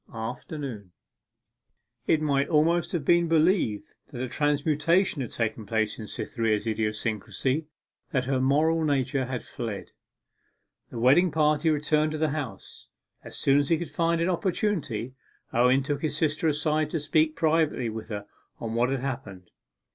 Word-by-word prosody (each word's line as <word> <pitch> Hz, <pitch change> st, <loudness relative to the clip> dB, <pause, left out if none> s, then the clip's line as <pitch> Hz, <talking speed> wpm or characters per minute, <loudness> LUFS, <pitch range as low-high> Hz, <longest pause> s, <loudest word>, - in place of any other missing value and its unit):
AFTERNOON 115 Hz, -, -6 dB, 1.1 s
It 155 Hz, -1 st, +3 dB
might 140 Hz, -2 st, +1 dB
almost 165 Hz, +2 st, +2 dB
have 165 Hz, -6 st, -2 dB
been 170 Hz, +1 st, +4 dB
believed 160 Hz, -, +2 dB, 0.2 s
that 135 Hz, -3 st, -9 dB
a -, -, -2 dB
transmutation 150 Hz, +5 st, +1 dB
had 120 Hz, -, -4 dB
taken 110 Hz, -2 st, -3 dB
place 110 Hz, 0 st, 0 dB
in 110 Hz, -, -6 dB
Cytherea's 110 Hz, -1 st, -1 dB
idiosyncrasy, 110 Hz, +6 st, -1 dB, 0.4 s
that 130 Hz, -2 st, 0 dB
her 130 Hz, 0 st, 0 dB
moral 155 Hz, +5 st, +3 dB
nature 135 Hz, -3 st, 0 dB
had 125 Hz, -2 st, -4 dB
fled. 115 Hz, -6 st, -6 dB, 1.0 s
The -, -, -8 dB
wedding 135 Hz, +10 st, +5 dB
party 155 Hz, +1 st, +2 dB
returned 155 Hz, 0 st, +1 dB
to -, -, -2 dB
the 155 Hz, 0 st, +1 dB
house. 135 Hz, -10 st, -7 dB, 0.3 s
As -, -, -7 dB
soon 140 Hz, +1 st, +4 dB
as 145 Hz, -, 0 dB
he 165 Hz, -, +4 dB
could 170 Hz, -, -6 dB
find 165 Hz, 0 st, +1 dB
an 170 Hz, +2 st, +1 dB
opportunity, 170 Hz, -, -1 dB, 0.4 s
Owen 125 Hz, +3 st, +4 dB
took 145 Hz, 0 st, -2 dB
his 155 Hz, -1 st, -1 dB
sister 155 Hz, 0 st, +1 dB
aside 150 Hz, 0 st, +1 dB
to 160 Hz, -, -2 dB
speak 155 Hz, +1 st, +1 dB
privately 155 Hz, -6 st, +1 dB
with 110 Hz, 0 st, -7 dB
her 105 Hz, -2 st, -5 dB, 0.3 s
on 115 Hz, -1 st, -4 dB
what 120 Hz, +2 st, +2 dB
had 135 Hz, -1 st, -1 dB
happened. 120 Hz, -9 st, -6 dB
145 Hz, 155 wpm, -27 LUFS, 120-155 Hz, 1.1 s, wedding